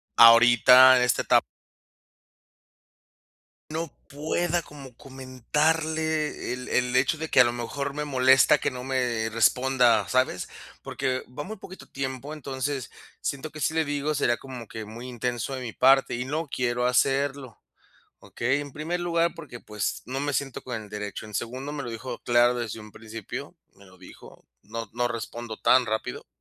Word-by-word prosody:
ahorita 120 +2 +8
en 125 - +3
esta 125 -2 +1
etap - - +4 2.3
no 160 -1 -4 0.2
pueda 165 +4 -1
como 135 -5 -12
comentarle 150 +4 -1
el 125 0 -6
el 125 0 0
hecho 130 +4 +2
de 160 +1 -6
que 130 - +5
a - - +9
lo 120 - 0
mejor 140 +4 -4
me 150 0 -3
molesta 130 +1 +5
que - - -1
no 125 0 -7
me 120 -4 -1
responda, 120 -1 +3
¿sabes? 130 0 0 0.3
Porque 130 0 -2
va 145 +4 -7
muy 220 +2 -7
poquito 190 0 -12
tiempo, 135 +2 -5
entonces, 135 -2 -4 0.3
siento 140 +2 -3
que 155 +1 -10
si - - +1
le 160 -1 0
digo, 145 +1 -1
sería 120 -4 +1
como 125 -4 -10
que 110 -1 -7
muy 115 +4 -9
intenso 120 +1 -3
de 130 - -5
mi 115 -3 -6
parte 135 -1 +4
y 125 +2 -3
no 155 +3 -2
quiero 125 -2 -1
hacerlo, 135 0 0 0.6
¿okey? 135 +5 -1
En 145 -1 -8
primer 165 +5 -3
lugar, 170 -1 +1
porque, 145 -7 -10
pues, 105 -1 -4
no 130 +2 -4
me 145 0 -2
siento 135 -1 -3
con 120 -3 -4
el 105 - -11
derecho. 105 0 -6
En 105 - -12
segundo, 130 +7 -4
me 145 - -4
lo 120 - -5
dijo 120 +2 -6
claro 120 0 +3
desde 115 -2 -4
un 105 0 -12
principio, 110 -1 -8 0.2
me 100 +1 -19
lo 95 0 -18
dijo: 90 - -15 0.2
"No 115 0 -7
no 120 0 0
respondo 115 -1 -6
tan 125 -2 +4
rápido". 110 0 -4
130 Hz, 170 wpm, -26 LUFS, 120-145 Hz, 2.3 s, a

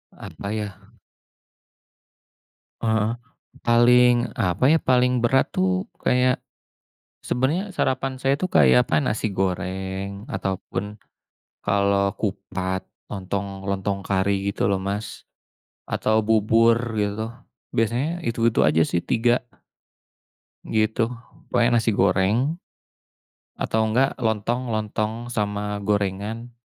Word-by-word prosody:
Apa 100 - -7
ya. 105 -1 -2 2.1
Heeh, 110 -1 +1 0.5
paling 120 +1 +4
apa 90 +6 0
ya 165 - +4
paling 125 -1 +3
berat 130 +3 +2
tuh 185 +1 +1 0.2
kayak, 125 0 +2 0.8
sebenarnya 165 +11 0
sarapan 130 -4 -1
saya 135 +1 +2
tuh 185 +5 -3
kayak 65 -4 +6
apa 75 - +1
nasi 105 +6 -1
goreng 95 +3 -3
atau 95 -8 -2
pun, 105 +1 -5 0.6
kalau 100 -1 +1
kupat 95 -2 -3 0.2
lontong 95 0 -4
lontong 100 0 -2
kari 100 0 0
gitu 100 - +1
loh 100 - +1
Mas, 100 +3 -5 0.6
atau 110 +1 +1
bubur 110 +1 +4 0.2
gitu 105 +2 -2 0.4
biasanya 125 +10 0
itu 115 -5 -2
itu - - +1
aja 80 +1 +4
sih 85 - 0
tiga. 120 +6 +1 1.3
Gitu 110 +1 +1 0.4
pokoknya 120 -1 +3
nasi 115 - +1
goreng. 95 0 +2 1.2
Atau 110 - 0
enggak 125 +5 +1
lontong 115 +1 0
lontong 110 +2 -2
sama 105 -1 -2
gorengan. 105 +3 -2
105 Hz, 105 wpm, -23 LUFS, 100-120 Hz, 2.1 s, kayak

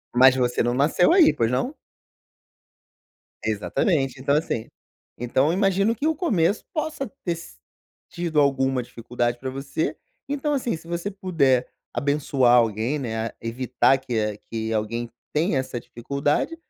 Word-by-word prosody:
Mas 130 +1 +7
você 125 -1 +1
não 120 +1 +1
nasceu 150 - +3
aí, 350 -4 +6
pois 115 -1 +1
não? 190 - -1 1.7
Exatamente. 130 - 0
Então, 140 +2 +2
assim, 135 -7 -1 0.5
então 125 +4 +1
eu 165 - +2
imagino 195 +3 +2
que 300 - -1
o 320 - +1
começo 205 - +1
possa 310 -4 -2 0.2
ter 170 -1 0
si 75 - -12 0.5
tido 170 -3 -1
alguma 135 -2 +2
dificuldade 120 0 -2
pra 130 +1 -4
você, 135 +3 -3 0.3
então 290 +1 -1
assim, 245 - -1
se 165 - -15
você 170 +3 -3
puder 150 -10 +1 0.3
abençoar 140 -4 +2
alguém 115 +5 +2
né, 115 -3 -3
evitar 125 +3 +2
que 110 -5 -2
que 110 -1 -3
alguém 115 +2 -2 0.2
tenha 155 0 +1
essa 130 -2 -4
dificuldade, 140 - -1
135 Hz, 140 wpm, -24 LUFS, 120-170 Hz, 1.7 s, Mas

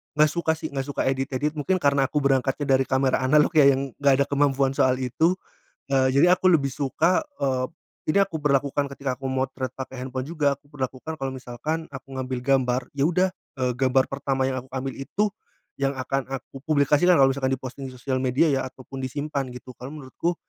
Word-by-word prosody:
nggak 150 0 +4
suka 160 -1 0
sih 160 - -5
nggak 135 -1 -3
suka 145 - -2
edit-edit, 135 +2 0
mungkin 155 +6 0
karena 140 -3 +3
aku 150 - 0
berangkatnya 135 +1 +2
dari 135 - +2
kamera 130 0 +2
analog 150 +4 +4
ya 145 -3 +7
yang 135 0 -2
nggak 140 -1 +5
ada - - -7
kemampuan 140 -1 +2
soal 130 -1 +3
itu, 155 +8 +1 0.6
eee, 135 -1 +3
jadi 175 +6 +6
aku 185 - -2
lebih 140 -6 +3
suka, 150 - +1 0.2
eee, 130 -2 +1 0.4
ini 155 - +2
aku 185 -5 -2
berlakukan 140 -1 +1
ketika 135 -2 -3
aku 135 - -5
memotret 130 -1 -2
pakai 130 -1 -6
handphone 130 0 -4
juga, 150 -3 +1
aku 140 +1 -27
berlakukan 135 +2 -4
kalau 135 -2 -2
misalkan 140 +6 -4
aku 135 -1 -9
ngambil 130 -1 -3
gambar, 130 -1 +2
ya 140 - -1
udah, 180 +3 +2 0.3
eee, 125 -1 +1
gambar 130 +1 +2
pertama 135 -1 -1
yang 130 -1 -2
aku 130 - -20
ambil 130 +1 -4
itu 200 +10 -1 0.5
yang 135 0 0
akan 135 0 -2
aku 135 0 -7
publikasikan 150 +4 +4
kalau 135 - +7
misalkan 135 0 0
di-posting 130 +1 -5
di - - -13
sosial 130 +1 -2
media 130 +5 +3
ya 135 -1 +2
ataupun 130 +1 -11
disimpan 140 +2 -2
gitu, 125 +1 -10
karena 130 +3 -8
menurutku, 165 +7 -2
135 Hz, 195 wpm, -25 LUFS, 130-145 Hz, 0.6 s, ya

